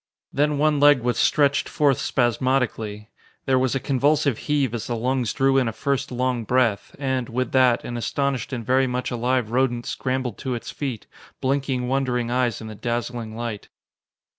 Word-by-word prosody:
Then 150 +1 +1
one 150 0 +2
leg 145 -2 +6
was 120 -1 0
stretched 140 -2 +2
forth 145 -3 +2
spasmodically. 120 -4 0 0.3
There 130 -1 +3
was 130 0 +1
a - - +1
convulsive 140 -1 +1
heave 140 -5 +1
as 115 -3 -4
the 120 - -2
lungs 125 0 0
drew 135 0 +3
in 125 - +1
a - - -1
first 135 +4 -2
long 125 -1 -1
breath, 115 -3 +1
and, 130 -3 -2
with 130 +1 -2
that, 130 -2 +4
an 120 - -4
astonished 135 +1 -1
and 120 -4 -4
very 130 +2 +3
much 125 +1 -2
alive 120 -1 0
rodent 120 -1 +1
scrambled 130 -1 -3
to 130 -2 -2
its 115 - -6
feet, 130 -7 -4 0.3
blinking 130 -2 -1
wondering 125 -3 0
eyes 125 -3 0
in 110 - -7
the 110 - -7
dazzling 120 0 -4
light. 115 -3 -5
130 Hz, 175 wpm, -23 LUFS, 120-135 Hz, 0.3 s, leg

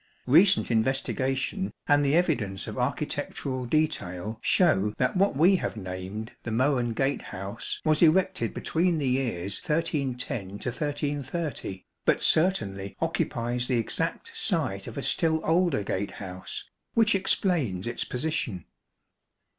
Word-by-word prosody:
Eecent 170 +3 +5
investigation 135 - 0 0.2
and 145 -1 +4
the 140 +2 +3
evidence 120 - 0
of - - -6
architectural 130 -2 -2
detail 110 - -1
show 105 - +3
that 125 +5 +1
what 190 -6 +2
we 180 +5 +6
have 115 - -3
named 95 +3 -6
the - - -5
Mohun 125 0 +1
Gatehouse 110 -5 -3
was 155 -1 +3
erected 185 +3 +3
between 170 +1 0
the 145 -3 -1
years 115 -8 -1
1310 130 - -1
1330, 145 - -3 0.2
but - - +3
certainly 100 - +1
occupies 120 +1 -1
the 125 - +1
exact 115 - -3
site - - -1
of - - -8
a - - -3
still 160 -1 +2
older 165 - +2
gatehouse, 95 -1 -5 0.3
which 225 -2 +5
explains 170 - +1
its 120 - -1
position. 125 - -2
130 Hz, 120 wpm, -27 LUFS, 105-160 Hz, 0.3 s, we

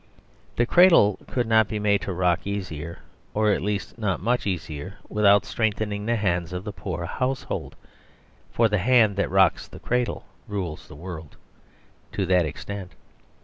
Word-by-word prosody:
The 120 - +2
cradle 165 - +6
could 125 -2 -1
not 110 -1 +4
be 105 - -3
made 105 -1 +2
to - - -4
rock 90 0 0
easier, 85 -5 -5 0.3
or, 105 0 +3
at - - 0
least, 105 +3 -3
not 105 -4 0
much 120 +2 0
easier, 90 0 -4
without 100 -2 +4
strengthening 105 -1 -1
the 120 - +2
hands 90 -5 -1
of 90 +1 -4
the 105 -1 -6
poor 90 -4 -5
household, 130 +8 -3 0.7
for 115 - +3
the 105 -2 0
hand 110 0 +4
that 100 - +1
rocks 95 -3 +3
the - - -12
cradle 125 -2 -1 0.2
rules 95 -7 -4
the 75 - -12
world 80 -2 -9 0.8
to 95 - -1
that 90 -2 +3
extent. 100 +4 -7
100 Hz, 160 wpm, -25 LUFS, 90-110 Hz, 0.8 s, cradle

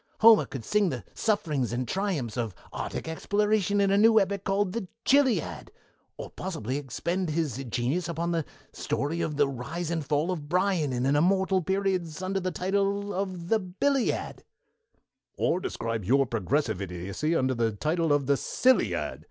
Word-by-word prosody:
Homer 225 -1 +7
could 135 -4 -7
sing 210 -3 +2
the - - -4
sufferings 155 - 0
and 120 +1 -2
triumphs 170 - -2
of 115 -6 -3 0.2
arctic - - -4
exploration 205 +4 +1
in 200 -1 +3
a 200 - +4
new 220 +1 +6
epic 200 0 0
entitled 195 -1 +1
'The 225 -5 -3 0.2
Chilliad', 275 -3 +2 0.5
or - - -7
possibly 140 - -4
expend 170 +6 -2
his 150 -5 -1
genius 135 +10 -1
upon 170 +1 -2
the 165 -2 0 0.3
story 160 +4 -2
of 150 -2 -2
the 145 -1 +4
rise 150 +6 -4
and 165 -2 -1
fall 150 +5 0
of 150 -5 -5
Bryan 180 -4 +1
in 125 0 -1
immortal 185 +7 +3
periods 190 -3 -1
under 195 +1 -1
the 185 0 -2
title 200 +3 -1
of 185 -2 -4
'The 225 - +3
Billiad'" 235 +8 -1 0.9
"Or 180 - +1
describe 115 - -3
your 135 +8 +3
progressive 115 - -1
idiocy 95 - -2
under 130 -3 +2
the 115 -2 +1
title 160 +7 0
of 145 -1 +2
'The 140 +1 +2
Silliad!'" 255 - +1
170 Hz, 160 wpm, -27 LUFS, 135-195 Hz, 0.9 s, Homer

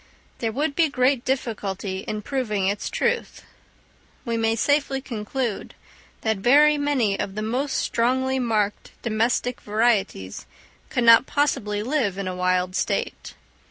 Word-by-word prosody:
There 225 -2 -1
would 285 +5 -1
be 325 -2 +3
great 255 -2 +2
difficulty 205 -7 -2
in 210 +2 -5
proving 215 -8 -1
its 200 +1 -1
truth: - - -1 0.8
we 235 -2 -1
may 225 0 +1
safely 285 +2 +1
conclude 235 -2 -4 0.5
that 220 -1 0
very 290 +8 +5
many 280 -9 0
of 195 - -3
the 215 - -3
most 260 +6 -1
strongly 260 +3 +1
marked 215 -4 -1
domestic 235 +2 0
varieties 205 - 0 0.4
could 245 - 0
not 230 +2 +7
possibly 210 -8 0
live 235 -7 0
in 195 -1 -3
a 185 - -3
wild 185 0 0
state. - - -2
230 Hz, 135 wpm, -24 LUFS, 205-265 Hz, 0.8 s, not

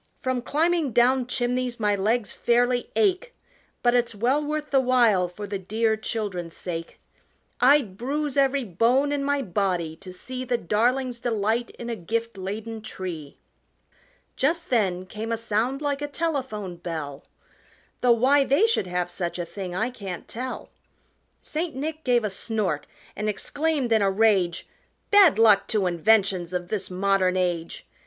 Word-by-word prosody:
From 255 -1 -1
climbing 315 0 +1
down 250 +2 +3
chimneys 250 -1 -1
my 210 -2 +2
legs 215 +2 0
fairly 245 +1 +1
ache, 430 +4 +1 0.5
But 240 0 +4
it's 240 -2 +1
well 255 +8 +1
worth 300 0 -3
the 275 - +5
while 240 -8 +3
for 190 +4 -8
the 200 -1 -4
dear 220 +4 0
children's 205 -6 -4
sake. 165 -2 -6 0.6
I'd 250 -7 +4
bruise 285 +3 -2
every 275 -1 +2
bone 240 +8 +2
in 285 -1 -1
my 285 0 0
body 180 -5 -1
to 190 0 -10
see 255 +8 -6
The 250 -1 0
darlings' 240 +5 0
delight 230 0 0
in 235 - -7
a 235 - -2
gift 230 +4 -3
laden 215 +4 -5
tree!" 175 -8 -7 1.0
Just 330 +4 0
then 185 -6 +1
came 215 +4 -6
a 230 - 0
sound 230 +5 -1
like 285 -1 -1
a 290 - -2
telephone 265 - -3
bell 155 -5 -6 0.8
Though 245 - +4
why 270 +5 +4
they 280 +10 +3
should 450 - +1
have 180 0 -2
such 175 -2 -3
a 175 - -3
thing 180 0 -6
I 225 +6 0
can't 195 -7 -7
tell 255 +3 -6 0.7
St. 315 -1 -3
Nick 310 +3 -4
gave 245 -2 +2
a 210 - -1
snort 195 -6 -2 0.3
and 215 0 -2
exclaimed 285 +4 -1
in 220 - +4
a 200 - +3
rage, 195 -4 +2 0.4
"Bad 400 - +7
luck 220 -3 +5
to 210 -3 0
inventions 185 0 +2
of 175 -1 -3
this 215 -3 -2
modern 185 0 +1
age!" 175 -2 -2
225 Hz, 160 wpm, -25 LUFS, 190-260 Hz, 1.0 s, Bad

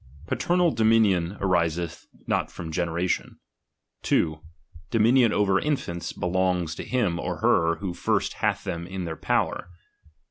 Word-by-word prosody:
Paternal 175 -1 +1
dominion 110 -5 +3
ariseth 85 -3 -1 0.2
not - - 0
from 80 -1 -7
generation. 85 +2 -1 0.6
2. 80 -1 +1 0.5
Dominion 115 +1 +4
over 100 -2 +2
infants 110 - -2
belongs 90 -2 0
to - - -6
him 105 -10 0
or - - -3
her 85 0 +3
who 90 +1 -4
first - - 0
hath - - 0
them 85 -2 -4
in 95 -1 -5
their 80 -1 -4
power. 85 - -1
90 Hz, 130 wpm, -25 LUFS, 85-110 Hz, 0.6 s, Dominion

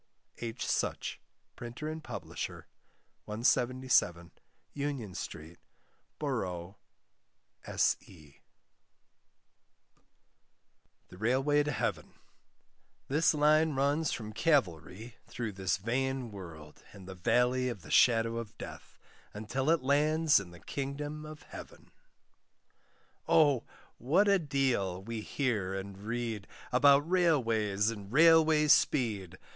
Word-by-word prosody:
H. 115 +1 -4
Such, - - -2 0.3
Printer 120 +5 -7
and 155 0 -5
Publisher, - - -6 0.6
177, 115 -6 +1 0.4
Union 140 -9 -4
Street, 80 -1 -8 0.6
Boro' 95 - -4 0.9
S.E. 75 -6 -2 2.7
THE 90 - -13
RAILWAY 135 +6 +2
TO 150 0 -1
HEAVEN. - - -3 0.9
This 155 +3 +3
Line 155 +1 +3
runs 145 +3 +1
from 110 -2 -5
Calvary 110 - 0
through 120 -3 -4
this 95 -3 -1
vain 125 +3 -2
world 80 -6 -11
and 95 -2 -12
the 95 - -7
Valley 125 +7 +1
of 105 -8 -7
the - - -11
Shadow 115 -1 +4
of 115 -2 -7
Death, - - -10 0.4
until 130 +7 -2
it 165 -4 +3
lands 150 +2 +3
in 100 -3 -9
the 85 0 -14
Kingdom 145 +2 -5
of 155 0 -11
Heaven. - - -12 1.4
Oh! 145 -6 +4 0.3
what 170 - +3
a 200 -1 +4
deal 130 - -1
we 115 +1 -5
hear 105 -7 -2
and 95 0 -6
read, 110 0 -4 0.2
About 140 +3 +5
Railways 115 - +2
and 100 -2 -9
Railway 160 +1 +5
speed! 105 - +2
120 Hz, 105 wpm, -31 LUFS, 100-145 Hz, 2.7 s, About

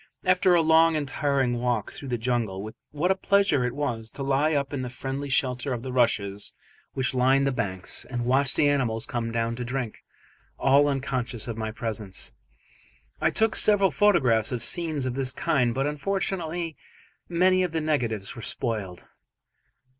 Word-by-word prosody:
After 185 0 +4
a 165 - +4
long 160 +1 +5
and 150 -2 -1
tiring 135 -4 0
walk 120 -4 -1
through 140 - -9
the 125 -2 -1
jungle 110 -4 -2 0.2
what 155 +5 0
a - - +3
pleasure 195 -8 +2
it 125 0 -2
was 120 -6 -3
to 140 - -5
lie 140 +3 +2
up 140 0 -1
in 140 - -2
the 125 - -4
friendly 135 +3 -5
shelter 130 0 0
of 120 -1 -5
the 130 - -5
rushes 105 -5 0 0.4
which 130 -1 0
line 130 +2 +3
the 135 - +1
banks, 95 -7 -2
and 120 -2 -4
watch 135 +2 +3
the 145 - +3
animals 120 -6 +1
come 115 -2 -3
down 115 0 -1
to 125 - -3
drink, 125 -2 -4 0.5
all 140 +2 +4
unconscious 130 -5 -1
of 115 - -4
my 110 -1 -3
presence. 110 -3 -5 0.9
I - - +3
took 220 0 +1
several 200 -3 +4
photographs 130 - +3
of 125 -2 -1
scenes 155 -6 -1
of 130 - -2
this 130 0 -1
kind, 125 -3 +1
but 135 +3 -1
unfortunately 170 +1 -2 0.5
many 185 +2 +3
of 180 -2 0
the 165 - -1
negatives 120 -10 -1
were 115 - -8
spoiled. 105 -7 -2
130 Hz, 175 wpm, -26 LUFS, 120-150 Hz, 0.9 s, long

